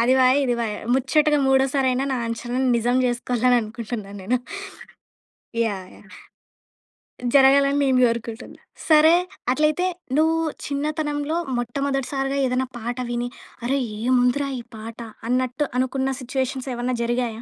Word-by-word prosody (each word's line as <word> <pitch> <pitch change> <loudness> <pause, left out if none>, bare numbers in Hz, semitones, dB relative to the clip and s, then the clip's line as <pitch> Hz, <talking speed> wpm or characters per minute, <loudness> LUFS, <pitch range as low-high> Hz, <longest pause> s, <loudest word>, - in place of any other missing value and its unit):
అది 245 +3 +4
పాయే, 255 0 +5
ఇది 245 -2 +1
పాయే. 215 -3 -2 0.2
ముచ్చటగా 295 +3 +3
మూడోసారయినా, 265 -1 +2
నా 260 - 0
అంచనాని 245 +3 -1
నిజం 240 +2 +1
జేసుకోవాలనుకుంటున్నాను 235 -4 -1
నేను. 240 +6 0 1.2
యాహ్! 200 -5 -1
యాహ్! - - -18 1.3
జరగాలని 275 +1 +5
నేను 260 -2 +3
గోరుకుంటున్నా. 230 0 -4 0.3
సరే. 315 +1 +7 0.4
అట్లయితే 305 +6 +2 0.3
నువ్వు 320 +1 +3 0.3
చిన్నతనంలో 295 +1 -2 0.2
మొట్టమొదటి 270 +3 -2
సారిగా 270 0 -1
ఏదైనా 255 0 0
పాట 240 +2 -4
విని, 240 0 -2 0.4
అరె! 270 +3 +1 0.2
ఏముందిరా 250 +3 +2
ఈ - - -6 0.2
పాట! 225 +2 -9 0.3
అన్నట్టు 255 +3 0
అనుకున్న 265 +1 0
సిట్యుయేషన్స్ 260 +1 -3
ఏవన్నా 245 +1 -2
జరిగాయా? 235 -1 -1
255 Hz, 115 wpm, -23 LUFS, 240-275 Hz, 1.3 s, సరే